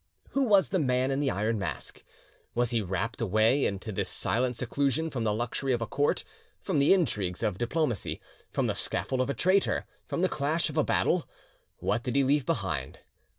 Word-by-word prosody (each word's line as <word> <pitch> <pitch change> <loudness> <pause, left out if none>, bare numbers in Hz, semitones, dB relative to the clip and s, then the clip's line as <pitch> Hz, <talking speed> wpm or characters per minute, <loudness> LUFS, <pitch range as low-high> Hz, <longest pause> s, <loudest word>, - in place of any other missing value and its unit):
Who 275 - +1
was 205 -7 +4
the 190 - +1
Man 130 -2 +1
in 135 - 0
the 145 -2 +1 0.2
Mask? 100 -5 -5 0.5
Was 120 0 +1
he 115 -2 +1
rapt 95 +5 -3
away 110 +6 +3
into 100 +2 -4
this 95 - -1
silent 125 +1 0
seclusion 140 +6 0
from 120 -4 -2
the 105 - +2
luxury 120 +4 -1
of 120 - -1
a - - -2
court, 145 +6 0 0.4
from 180 -7 0
the 140 - +5
intrigues 105 - +1
of 95 -3 -1
diplomacy, 120 - -1 0.3
from - - 0
the - - +1
scaffold 130 -1 -1
of 130 - -1
a 140 - -1
traitor, 190 +2 +2 0.2
from 175 - -1
the - - +5
clash 155 +1 0
of 155 0 +1
battle? 175 -2 +1 0.5
What 110 - 0
did 120 0 -3
he 140 - +4
leave 140 0 +2
behind? 75 -10 -2
130 Hz, 190 wpm, -29 LUFS, 110-150 Hz, 0.5 s, the